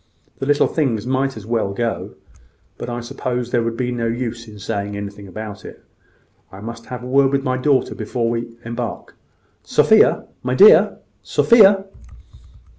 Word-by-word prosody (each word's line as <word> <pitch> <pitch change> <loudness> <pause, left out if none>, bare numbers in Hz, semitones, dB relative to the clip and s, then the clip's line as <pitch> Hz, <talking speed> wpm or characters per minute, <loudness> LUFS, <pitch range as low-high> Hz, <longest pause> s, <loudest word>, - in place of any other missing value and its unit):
The 135 - -3
little 145 0 +3
things 120 -9 -1
might 130 0 -1
as 105 - -9
well 110 -3 -1
go; 115 +2 -3 0.6
but - - -5
I 120 0 -4
suppose 120 0 -4
there 120 - +2
would 115 0 -3
be 125 -1 -1
no 120 -1 -2
use 115 0 -4
in 105 -1 -12
saying 100 0 -4
anything 100 0 -7
about 105 +1 -8
it. - - -12 0.7
I 95 - -11
must 115 +2 -8
have 125 -1 -7
a - - -7
word 135 +1 +3
with 140 -1 0
my 130 -1 0
daughter 130 -1 +1
before 115 +1 -3
we 115 0 -4
embark. 115 -1 -5 0.5
Sophia, - - +4 0.2
my 125 0 -1
dear! 205 +7 +7 0.2
Sophia!" 200 -4 +5
120 Hz, 165 wpm, -20 LUFS, 110-130 Hz, 0.7 s, dear